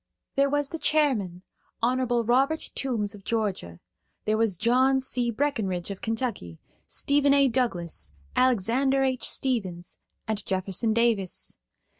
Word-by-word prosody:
There 275 0 +3
was 290 0 0
the 330 - -5
chairman, 260 - +1 0.4
Hon. 255 +2 +2 0.2
Robert 270 +7 +1
Toombs 225 -7 -2
of 205 -2 -12
Georgia; 200 - -2 0.5
there 215 - +2
was 220 -5 +1
John 255 +5 +3
C. 250 -2 0
Breckenridge 215 -8 -1
of 195 - -7
Kentucky, 225 - -3 0.3
Stephen 280 0 +3
A. 280 -1 +5
Douglas, 205 - -2 0.2
Alexander 255 +3 +2
H. 260 -2 +1
Stevens, 190 -10 -1 0.3
and 215 -2 -2
Jefferson 190 +3 -1
Davis. 230 -6 0
235 Hz, 125 wpm, -26 LUFS, 195-265 Hz, 0.5 s, A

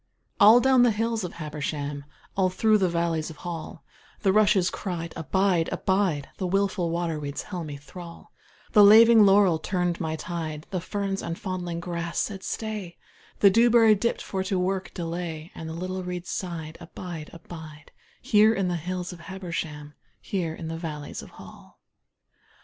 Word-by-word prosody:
All 220 +4 +8
down 260 0 +4
the 245 - +6
hills 225 0 -1
of 180 - -5
Habersham, 145 -2 -4 0.3
All 190 -1 +2
through 215 +3 +3
the 185 -2 +2
valleys 170 -2 -1
of 160 - -9
Hall, 165 0 -7 0.4
The 190 -2 +3
rushes 205 -3 +4
cried 170 -4 -4
`Abide, 180 +1 +1
abide,' 190 -7 0
The 185 - -2
willful 195 -2 0
waterweeds 160 -4 -3
held 175 -5 -6
me 145 -1 -6
thrall, 170 +4 -11 0.4
The 210 - +7
laving 220 +1 +8
laurel 195 -4 +5
turned 180 +1 -1
my 160 -1 -2
tide, 160 -2 -5
The 185 -3 -2
ferns 195 +1 -3
and 165 - -4
the - - -16
fondling 180 -3 -4
grass 170 -1 -4
said 200 -3 -1
`Stay,' 210 -5 -5 0.5
The 200 - +7
dewberry 230 0 +6
dipped 225 +3 -1
for 190 -1 -3
to 190 -1 0
work 190 +1 -1
delay, 165 -1 -5
And 160 - -7
the - - -5
little 185 +2 -4
reeds 180 -1 -5
sighed 165 -4 -5
`Abide, 170 -2 -8
abide, 160 -3 -11 0.3
Here 220 -3 +5
in 195 -3 0
the 175 - -1
hills 180 +2 -4
of 175 - -12
Habersham, 170 -5 -6 0.3
Here 170 -5 -3
in 165 - -7
the 165 0 -4
valleys 150 -3 -6
of - - -12
Hall.' - - -15
180 Hz, 165 wpm, -26 LUFS, 165-195 Hz, 0.5 s, All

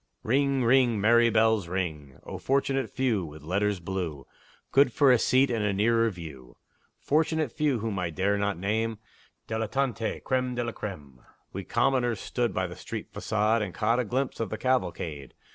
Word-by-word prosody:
Ring, 135 +2 +2
ring! 120 -2 +4
merry 120 +3 +5
bells, 110 -4 +2
ring! 80 -7 -4
O - - -7
fortunate 135 0 0
few, 120 -7 0
With 75 -2 -10
letters 100 +4 0
blue, 85 -5 -4 0.5
Good 135 -2 +5
for 140 +2 +4
a 125 - +5
seat 130 +3 +3
and 115 -3 0
a 105 -1 +1
nearer 115 +3 +3
view! 75 - -10 0.4
Fortunate 155 -2 +1
few, 150 -3 0
whom 105 -3 -2
I 90 -2 -1
dare 95 +5 0
not 100 -3 -1
name; 110 +4 -1 0.5
Dilettanti! 110 +1 -2
Crême 130 -1 0
de 120 - -1
la 120 - -3
crême! 75 - -8 0.3
We 95 - -4
commoners 120 -2 +1
stood 120 +2 -1
by 95 0 -1
the 90 0 -7
street - - -7
façade, 110 +1 +1
And 100 -4 -4
caught 115 +3 +1
a - - +2
glimpse 130 +4 -2
of 115 -3 -2
the 110 - -4
cavalcade. 85 - -2
110 Hz, 175 wpm, -27 LUFS, 95-125 Hz, 0.5 s, merry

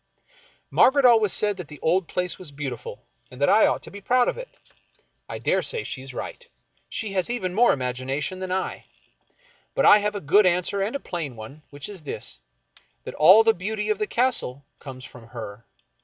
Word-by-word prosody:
Margaret 275 +1 +4
always 225 -5 +5
said 205 -2 +2
that 180 - -7
the 150 - -12
old 175 +2 +1
place 180 -1 -3
was 180 -4 -7
beautiful, 140 -4 -7 0.2
and 125 - -13
that 140 - +3
I 215 - +6
ought - - -1
to - - -10
be 200 - -10
proud 245 +4 +2
of - - 0
it. - - -8 0.8
I - - -5
dare - - +1
say 465 -3 -1
she 130 - -5
is 135 0 -9
right. 485 - -7 0.5
She 215 -4 -3
has 185 +3 -1
even 190 -7 -3
more 240 +5 +5
imagination 130 +6 -3
than 185 -1 -5
I. 190 +1 -3 0.9
But - - +2
I 210 - +8
have 210 0 -2
a - - -2
good 190 +5 +4
answer 180 +3 +1
and 210 +7 -2
a - - -1
plain 165 - -5
one, 115 +8 -11
which 145 0 -8
is 200 -4 -7
this, 105 - -6 0.3
— - - -32
that - - -7
all 190 +8 +7
the 225 0 +4
beauty 210 +3 -4
of 215 -1 0
the 215 - -1
Castle 230 - -1
comes 130 -2 -10
from 115 -2 -14
her. 115 -2 -9
185 Hz, 205 wpm, -24 LUFS, 140-210 Hz, 0.9 s, I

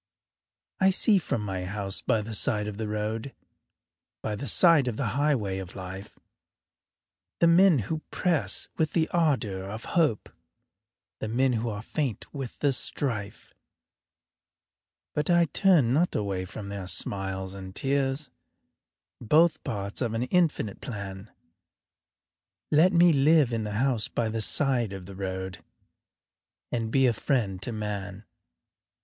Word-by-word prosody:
I 190 - +5
see 195 +2 +4
from 120 -9 -2
my 95 -3 -4
house 100 0 +1
by 110 -2 +1
the 110 +1 -6
side 105 -2 +1
of 105 -1 -6
the 110 -1 -3
road 110 +4 -3 0.9
By 105 - -2
the 140 +6 -6
side 160 - +5
of 115 -3 -2
the 130 -6 -1
highway 125 -10 0
of 95 -1 -8
life, 95 +1 -8 1.2
The - - +4
men 170 0 +6
who 155 +8 -3
press 175 -5 0
with 160 -1 0
the 165 -2 +2
ardor 130 - 0
of 110 +3 -7
hope, 155 - +1 0.9
The - - -3
men 125 +4 +1
who 115 0 -1
are 105 0 -5
faint 130 -5 -3
with 135 -4 -6
the 145 -2 +3
strife, 115 -5 -3 1.6
But 150 +2 -1
I 175 -1 +5
turn 165 -9 +3
not 170 +5 +1
away 95 -3 -2
from 100 +2 -8
their 100 -2 -6
smiles 95 0 -2
and 95 -1 -9
tears, 140 +1 -1 0.9
Both 155 +8 +3
parts 100 -5 -4
of 115 -3 -1
an 115 - 0
infinite 150 - 0
plan 100 -2 -7 1.4
Let 160 +5 +5
me 175 -1 +5
live 145 -2 +4
in 110 -2 -2
a - - -5
house 115 +1 0
by 115 -2 -2
the 110 0 -2
side 120 -3 +2
of 95 -2 -8
the 100 +1 -10
road 95 -1 -5 1.1
And 115 -2 -2
be 135 +3 +3
a 120 - +3
friend 110 -7 -1
to 120 - -3
man. 100 -2 -5
115 Hz, 145 wpm, -27 LUFS, 100-145 Hz, 1.6 s, men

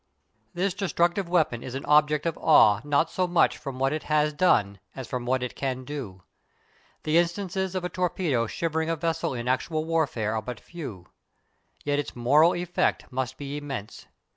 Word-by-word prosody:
This 185 +1 0
destructive 175 -1 0
weapon 155 -9 +1
is 130 - -7
an 135 - -5
object 150 0 +3
of 165 -2 0
awe 105 -10 +6
not 145 +2 +1
so 185 -1 0
much 175 -1 +2
from 135 -3 -6
what 135 +2 +1
it 155 - -2
has 150 0 +2
done 105 - +2 0.2
as 130 -3 -6
from 125 0 -4
what 130 0 +1
it 125 - -4
can 130 -2 -3
do. 120 - -7 0.8
The 155 +2 +3
instances 190 +2 -1
of 185 -1 -2
a - - -2
torpedo 165 -9 0
shivering 160 +4 -2
a 165 - +1
vessel 165 -3 -2
in 120 0 -4
actual 155 +5 0
warfare 145 -10 0
are 110 - -1
but 120 +1 -7
few. 120 - -8 0.8
Yet 145 0 +1
its 145 - -4
moral 145 +8 +4
effect 175 -3 -1
must 130 0 -3
be 140 0 -5
immense. 135 -8 -7
150 Hz, 180 wpm, -26 LUFS, 130-170 Hz, 0.8 s, awe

